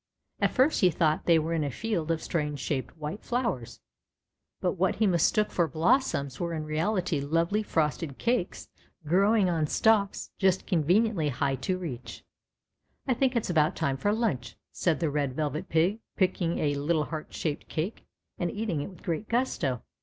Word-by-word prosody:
At - - +3
first 270 +4 +2
he 185 - +6
thought 155 -2 +1
they 170 -2 +6
were 160 +1 -1
in 160 -2 +1
a 145 - -1
field 175 - -2
of 165 -1 0
strange 150 -3 -2
shaped 135 +3 -3
white 155 +7 -5
flowers, 235 - -2 0.8
but - - +1
what - - 0
he 220 - +2
mistook 195 +3 +2
for 170 -2 +2
blossoms 160 - +1
were 170 -1 -2
in 155 - -3
reality 165 +2 0
lovely 165 +8 +1
frosted 155 -6 -1
cakes 235 -6 -1 0.4
growing 195 +5 +4
on 165 -3 +1
stalks 210 +2 +2
just 190 -1 +2
conveniently 180 0 +2
high 135 +1 0
to 185 +8 -1
reach. 125 -10 -7 0.4
" - - -42
I 260 - +3
think 260 +1 +1
it's 225 -6 0
about 160 +1 +3
time 140 -4 0
for 205 +10 0
lunch," 190 - -1 0.2
said 170 -2 0
the 160 -3 +1
Red 140 -3 -1
Velvet 150 0 -2
Pig, 175 +7 +2 0.2
picking 180 -3 +1
a 145 -1 +1
little 150 +2 +1
heart 155 -1 -6
shaped 150 -3 -3
cake 170 +8 -4 0.3
and 175 - 0
eating 205 -6 -2
it 145 - -5
with 185 - -15
great 170 +5 -3
gusto. 175 - 0
165 Hz, 175 wpm, -28 LUFS, 150-205 Hz, 0.8 s, he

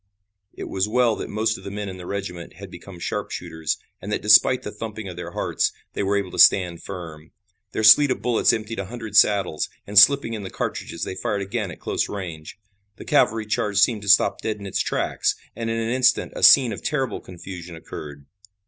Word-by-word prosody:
It - - -8
was 95 +1 -2
well 120 0 +2
that - - -6
most 110 +1 -1
of - - -15
the - - -6
men 100 +1 -5
in 95 -1 -7
the 90 -1 -10
regiment 90 -4 -6
had - - -11
become 95 -3 -11
sharpshooters, 80 -2 -4 0.2
and 100 - -6
that - - -2
despite 110 +4 +5
the 105 - -6
thumping 110 -1 -7
of 90 - -7
their - - -8
hearts, - - -1 0.2
they - - -3
were 100 +1 +1
able 95 -2 -3
to - - -6
stand 90 -3 +5
firm. 80 -5 -9 0.4
Their 110 - -2
sleet 125 +7 +8
of 130 - -1
bullets 120 -2 +2
emptied 110 -1 -4
a 100 - -3
hundred 110 -1 -8
saddles, 100 -6 +3 0.2
and 100 0 +5
slipping 140 +1 +5
in 110 - -5
the 95 - -7
cartridges 85 -2 -5
they - - -4
fired 100 +2 -3
again 105 0 -3
at 85 - -10
close - - -2
range. 85 -6 -7 0.4
The - - -11
cavalry 110 0 +2
charge 105 -2 -2
seemed 105 +1 +3
to 100 - -6
stop 100 - +4
dead 110 -1 -3
in 100 - -10
its 95 - -3
tracks, - - -1 0.2
and 115 0 -4
in 115 - -1
an 115 0 -2
instant 125 -1 +2
a - - -6
scene 125 -5 +7
of - - -8
terrible 135 -4 -2
confusion 90 -1 -10
occurred. 75 -3 -10
100 Hz, 215 wpm, -23 LUFS, 95-115 Hz, 0.4 s, sleet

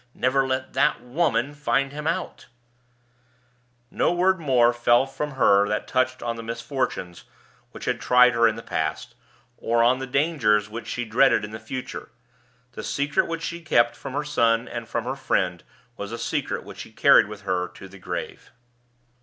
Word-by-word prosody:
Never 135 +1 +1
let 130 0 -3
that 145 +3 +2
Woman 135 -1 0
find 140 -2 0
him 150 +1 -7
out_!" 170 +2 -3 1.5
No - - +1
word 185 +1 +2
more 125 -6 +3
fell 120 +1 +3
from 145 +2 -5
her 100 -6 +4
that 105 +1 -2
touched 130 0 0
on 115 -1 -3
the - - -6
misfortunes 115 - -4 0.5
which - - -9
had - - -1
tried 125 0 +5
her 115 0 +4
in 110 - 0
the 115 - -8
past, - - -3 0.4
or 115 0 +1
on 125 +2 +3
the 135 - -5
dangers 125 -7 +1
which 115 +2 -7
she 120 - -3
dreaded 115 0 +3
in 105 - -10
the 110 - -7
future. 125 +3 -7 0.6
The - - -7
secret 145 +1 0
which 165 0 -4
she 170 +1 -4
had 165 - -19
kept 120 -4 +3
from 135 - -8
her 145 +2 -1
son 115 -5 +1
and 115 -1 -6
from 120 - -2
her 130 +3 -3
friend 90 -9 -1 0.3
was 100 +1 -6
a 115 - -4
secret - - -3
which - - -12
she - - -9
carried - - +5
with 105 0 -9
her 90 -2 -1
to - - -13
the - - -14
grave. - - -6
125 Hz, 185 wpm, -24 LUFS, 115-140 Hz, 1.5 s, tried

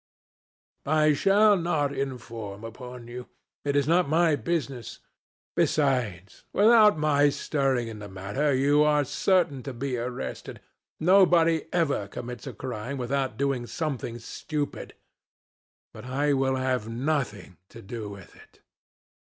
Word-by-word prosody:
I 155 0 +4
shall 200 +8 +5
not 155 -5 0
inform 115 -6 -5
upon 120 +1 -9
you. 125 +1 -8 0.4
It 145 0 -1
is 140 -1 +2
not 170 -1 +3
my 160 0 +3
business. 140 -7 -3 0.6
Besides, 120 - 0
without 215 -1 +6
my 145 -1 +3
stirring 135 -4 0
in 110 -2 -7
the 105 -1 -8
matter, 100 +10 -1
you 140 +3 +3
are 150 -1 +3
certain 170 -3 +1
to 135 +1 -6
be 130 0 -3
arrested. 120 +1 -5 0.4
Nobody 170 -3 +4
ever 145 - 0
commits 120 +2 -7
a - - -5
crime 125 +1 -5
without 135 +1 -2
doing 135 -3 -1
something 135 -8 -4
stupid. 145 +5 -5 1.0
But - - -10
I 140 +3 0
will 135 -1 +1
have 130 -4 -1
nothing 115 - -2
to 115 - -12
do 105 +1 -6
with 100 -3 -12
it." - - -19
135 Hz, 130 wpm, -26 LUFS, 120-155 Hz, 1.0 s, without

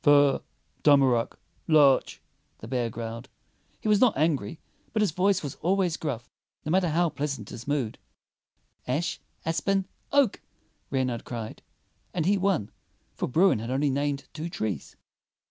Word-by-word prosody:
"Fir, 145 -3 +5 0.4
tamarack, 135 -5 +4 0.3
larch," 145 -4 +4 0.3
the 110 - -10
bear 120 -1 0
growled. 115 +2 -6 0.5
He - - -3
was 210 -1 +4
not 245 - +5
angry, 155 -3 0 0.3
but 215 -1 +3
his 200 - +1
voice 185 +2 +2
was 145 - -4
always 180 -1 +2
gruff, 125 -8 -4 0.4
no 155 - -1
matter 180 -1 +3
how 170 +2 +2
pleasant 140 -8 -4
his 120 +2 -9
mood. 140 -7 -1 0.9
"Ash, 145 +3 -1 0.3
aspen, 195 +4 +1 0.3
oak," 280 -7 +3 0.5
Reynard 130 -3 -1
cried; 115 -3 -6 0.5
and 165 -3 0
he 200 +3 +4
won, 190 - 0 0.4
for - - -2
Bruin 160 - +4
had 115 +2 -5
only 135 +2 +1
named 140 0 -1
two 160 +2 -4
trees. 105 - -4
145 Hz, 145 wpm, -27 LUFS, 125-175 Hz, 0.9 s, Fir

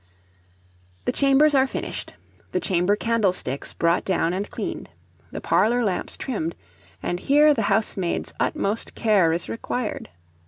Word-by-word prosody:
The - - +1
chambers 280 +2 +4
are 265 -1 +4
finished, - - -5 0.4
the - - +1
chamber 185 +1 +2
candlesticks 200 - 0
brought 170 +1 +2
down 175 -2 0
and 195 +2 -3
cleaned, - - -5 0.4
the - - -6
parlour 240 +2 +2
lamps 195 -5 -2
trimmed; 185 -11 -3 0.5
and 175 - -2
here 295 +5 +5
the 240 - -1
housemaid's 195 -4 0
utmost 205 +3 -1
care 200 -7 +3
is 170 +2 -2
required. 230 0 -4
210 Hz, 130 wpm, -23 LUFS, 180-245 Hz, 0.5 s, here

